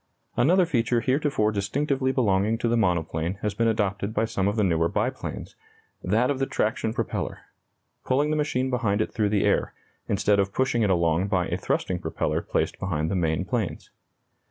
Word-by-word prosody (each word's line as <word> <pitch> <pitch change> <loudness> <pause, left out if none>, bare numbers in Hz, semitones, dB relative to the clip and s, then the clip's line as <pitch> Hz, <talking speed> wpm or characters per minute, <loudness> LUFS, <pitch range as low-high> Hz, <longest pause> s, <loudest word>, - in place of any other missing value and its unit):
Another 180 +7 +4
feature 120 -6 +1
heretofore 130 -5 +1
distinctively 130 +6 0
belonging 110 -3 +2
to 120 - -1
the 115 - +2
monoplane 85 -4 0
has 105 -1 0
been 115 - +1
adopted 105 -1 -1
by 110 - +2
some 100 -3 -1
of 100 - 0
the 110 - +2
newer 85 -3 +2
biplanes, - - -3 0.5
that 115 +8 +2
of 135 - -2
the 135 - 0
traction 110 +1 -1
propeller - - -3 0.6
pulling 145 +4 +1
the - - +1
machine 130 -4 0
behind 115 -5 0
it 110 - -1
through 105 -3 +1
the 100 -1 +1
air, - - +1 0.3
instead 105 0 +2
of 100 0 0
pushing 125 -1 +1
it 105 - +2
along 85 0 +2
by 95 -3 +1
a - - 0
thrusting - - -1
propeller - - -2
placed - - -2
behind 80 -4 -1
the - - 0
main 85 0 0
planes. 115 -4 -3
110 Hz, 180 wpm, -25 LUFS, 95-125 Hz, 0.6 s, Another